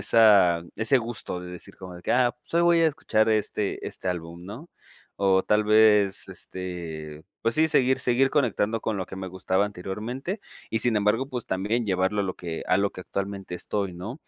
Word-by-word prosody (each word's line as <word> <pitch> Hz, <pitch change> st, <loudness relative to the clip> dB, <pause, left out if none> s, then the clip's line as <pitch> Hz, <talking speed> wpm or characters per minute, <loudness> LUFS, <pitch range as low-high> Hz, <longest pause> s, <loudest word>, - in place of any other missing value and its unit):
esa 100 Hz, -7 st, +5 dB
ese 110 Hz, +5 st, +3 dB
gusto 115 Hz, -6 st, -4 dB
de 90 Hz, 0 st, -8 dB
decir 90 Hz, -, -10 dB
como 95 Hz, -1 st, -10 dB
de 90 Hz, -, -10 dB
que: -, -, 0 dB
"Ah, 125 Hz, -1 st, +3 dB
pues 165 Hz, -, -11 dB
hoy 170 Hz, -, +4 dB
voy 170 Hz, -1 st, +5 dB
a 165 Hz, -, +5 dB
escuchar 115 Hz, -8 st, +1 dB
este 105 Hz, -1 st, 0 dB
este 95 Hz, -, -5 dB
álbum", 85 Hz, -1 st, -5 dB
¿no? 125 Hz, -, -9 dB, 0.5 s
O 95 Hz, -1 st, +4 dB
tal 105 Hz, 0 st, +2 dB
vez 105 Hz, -2 st, +4 dB
este, 80 Hz, -4 st, -6 dB, 0.2 s
pues, 115 Hz, 0 st, +1 dB
sí 160 Hz, +1 st, +4 dB
seguir, 130 Hz, -3 st, +3 dB
seguir 130 Hz, +1 st, +2 dB
conectando 115 Hz, -5 st, +1 dB
con 110 Hz, -, -2 dB
lo 95 Hz, -, -2 dB
que 95 Hz, -, -10 dB
me 95 Hz, -, -5 dB
gustaba 95 Hz, +1 st, 0 dB
anteriormente 110 Hz, -, -5 dB, 0.3 s
y 110 Hz, -, 0 dB
sin 120 Hz, +1 st, +2 dB
embargo, 105 Hz, +6 st, +1 dB
pues, 125 Hz, -4 st, -4 dB
también 105 Hz, +5 st, -1 dB
llevarlo 95 Hz, +1 st, 0 dB
a 100 Hz, -, 0 dB
lo 95 Hz, -, -3 dB
que 85 Hz, -2 st, -5 dB
a 90 Hz, -, +4 dB
lo 100 Hz, +1 st, +1 dB
que -, -, -9 dB
actualmente 95 Hz, -1 st, -5 dB
estoy, 100 Hz, -2 st, -2 dB
¿no? 105 Hz, -, -7 dB
105 Hz, 200 wpm, -26 LUFS, 95-120 Hz, 0.5 s, esa